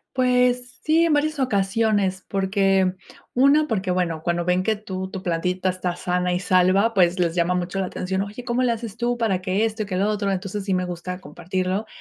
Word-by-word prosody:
Pues 250 Hz, 0 st, +2 dB
sí, 325 Hz, +2 st, +4 dB
en 325 Hz, -, +2 dB
varias 300 Hz, +1 st, 0 dB
ocasiones, 200 Hz, -4 st, +1 dB
porque 195 Hz, -1 st, +2 dB, 0.4 s
una 280 Hz, +4 st, +4 dB
porque 190 Hz, -4 st, -2 dB
bueno, 175 Hz, -3 st, 0 dB
cuando 175 Hz, 0 st, 0 dB
ven 180 Hz, +1 st, +2 dB
que 220 Hz, +3 st, +1 dB
tú 190 Hz, -3 st, -6 dB
tu 190 Hz, -1 st, -7 dB
plantita 180 Hz, +2 st, -1 dB
está 180 Hz, -1 st, -2 dB
sana 180 Hz, 0 st, -1 dB
y 180 Hz, -, 0 dB
salva, 185 Hz, +4 st, +3 dB
pues, 180 Hz, -1 st, +3 dB
les 170 Hz, -2 st, +1 dB
llama 175 Hz, +1 st, +1 dB
mucho 180 Hz, +2 st, -2 dB
la 185 Hz, -, -1 dB
atención. 190 Hz, +1 st, -2 dB
"Oye, 205 Hz, +5 st, -6 dB
¿cómo 245 Hz, 0 st, 0 dB
le 250 Hz, -, +2 dB
haces 230 Hz, -2 st, -5 dB
tú 240 Hz, +1 st, -1 dB
para 200 Hz, -6 st, 0 dB
que 190 Hz, +3 st, +1 dB
esto 215 Hz, -2 st, -3 dB
que 185 Hz, -, -3 dB
lo 195 Hz, +3 st, +1 dB
otro?". 210 Hz, -1 st, -1 dB
Entonces 195 Hz, +1 st, -3 dB
sí 195 Hz, -2 st, +1 dB
me 185 Hz, 0 st, 0 dB
gusta 180 Hz, +1 st, -5 dB
compartirlo, 185 Hz, +4 st, -3 dB
195 Hz, 205 wpm, -23 LUFS, 180-225 Hz, 0.4 s, sí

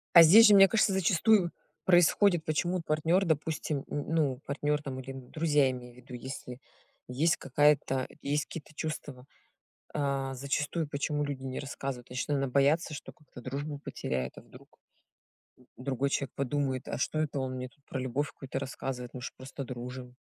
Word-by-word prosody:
А 170 Hz, -, +12 dB
здесь 215 Hz, +8 st, +9 dB
же, 210 Hz, -, +8 dB
мне 195 Hz, 0 st, +9 dB
кажется, 210 Hz, -1 st, +2 dB
зачастую 190 Hz, +1 st, +3 dB, 0.3 s
происходит 175 Hz, 0 st, +5 dB
Почему 175 Hz, +4 st, 0 dB
партнёр, 165 Hz, +4 st, +2 dB
допустим, 160 Hz, -1 st, -1 dB
н 145 Hz, -, -3 dB
ну, 145 Hz, -6 st, +1 dB
партнёр 145 Hz, +1 st, -1 dB
там 135 Hz, -3 st, -5 dB
или 130 Hz, +1 st, -7 dB
друзья, 145 Hz, +2 st, +1 dB
имею 125 Hz, -1 st, -8 dB
в -, -, -20 dB
виду, 125 Hz, +1 st, -13 dB
если 125 Hz, 0 st, -7 dB, 0.5 s
есть 145 Hz, +7 st, +2 dB
какая-то 135 Hz, -1 st, +2 dB
есть 145 Hz, +1 st, 0 dB
какие-то 155 Hz, -1 st, -9 dB
чувства, 145 Hz, -5 st, -5 dB, 0.7 s
а, 140 Hz, -2 st, -1 dB
зачастую 150 Hz, +4 st, -1 dB
почему 145 Hz, +1 st, -1 dB
люди 140 Hz, -2 st, -4 dB
не 130 Hz, -1 st, -4 dB
рассказывают? 135 Hz, -3 st, -5 dB
Значит, 125 Hz, 0 st, -4 dB
наверно, 140 Hz, -2 st, +1 dB
боятся, 145 Hz, +5 st, +2 dB
что 145 Hz, -, -8 dB
как-то 145 Hz, -4 st, -14 dB
дружбу 140 Hz, +4 st, -4 dB
потеряет, 65 Hz, 0 st, -3 dB
а -, -, -11 dB
вдруг -, -, -18 dB, 1.0 s
другой 135 Hz, +1 st, -1 dB
человек 140 Hz, -2 st, -1 dB
подумает: 135 Hz, -1 st, -1 dB
"А -, -, -3 dB
что 155 Hz, -, 0 dB
это 150 Hz, -2 st, -1 dB
он 130 Hz, -1 st, -2 dB
мне 125 Hz, 0 st, -5 dB
тут 140 Hz, -, -31 dB
про 130 Hz, -, -4 dB
любовь 130 Hz, +3 st, -1 dB
какую-то 135 Hz, -1 st, -5 dB
рассказывает, 130 Hz, -2 st, -5 dB
мы 125 Hz, -, -6 dB
ж 120 Hz, -, -5 dB
просто 130 Hz, +2 st, -7 dB
дружим". 125 Hz, 0 st, -7 dB
140 Hz, 170 wpm, -30 LUFS, 130-155 Hz, 1.0 s, А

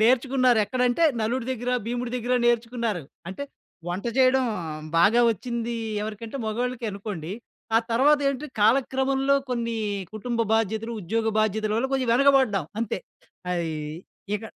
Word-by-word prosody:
నేర్చుకున్నారు. 255 Hz, 0 st, +4 dB
ఎక్కడంటే 250 Hz, +6 st, +1 dB, 0.2 s
నలుడు 235 Hz, +2 st, -1 dB
దగ్గర, 245 Hz, 0 st, -5 dB, 0.2 s
భీముడు 245 Hz, 0 st, -2 dB
దగ్గర 245 Hz, +1 st, -2 dB
నేర్చుకున్నారు. 230 Hz, -5 st, 0 dB, 0.3 s
అంటే 280 Hz, +9 st, -5 dB, 0.4 s
వంట 185 Hz, +6 st, -3 dB
చేయడం 260 Hz, 0 st, +5 dB, 0.5 s
బాగా 220 Hz, +7 st, +5 dB
ఒచ్చింది 235 Hz, +2 st, -4 dB, 0.3 s
ఎవరికంటే 220 Hz, +3 st, -6 dB
మగొళ్ళకె 245 Hz, +2 st, -2 dB
అనుకోండి. 195 Hz, -4 st, -5 dB, 0.4 s
ఆ -, -, +8 dB
తర్వాతేంటి? 280 Hz, +2 st, +3 dB
కాలక్రమంలో 265 Hz, +4 st, +3 dB
కొన్ని 235 Hz, -2 st, -1 dB, 0.4 s
కుటుంబ 230 Hz, +2 st, -2 dB
బాధ్యతలు, 225 Hz, +1 st, 0 dB
ఉద్యోగ 225 Hz, +5 st, 0 dB
బాధ్యతలవల్ల 215 Hz, +4 st, 0 dB
కొంచెం 255 Hz, -3 st, 0 dB
వెనకబడ్డం 260 Hz, -, +4 dB
అంతే. 230 Hz, -, -1 dB, 0.5 s
అయ్ 170 Hz, -2 st, -1 dB, 0.7 s
ఇక 210 Hz, -, -11 dB
235 Hz, 115 wpm, -25 LUFS, 220-255 Hz, 0.7 s, ఆ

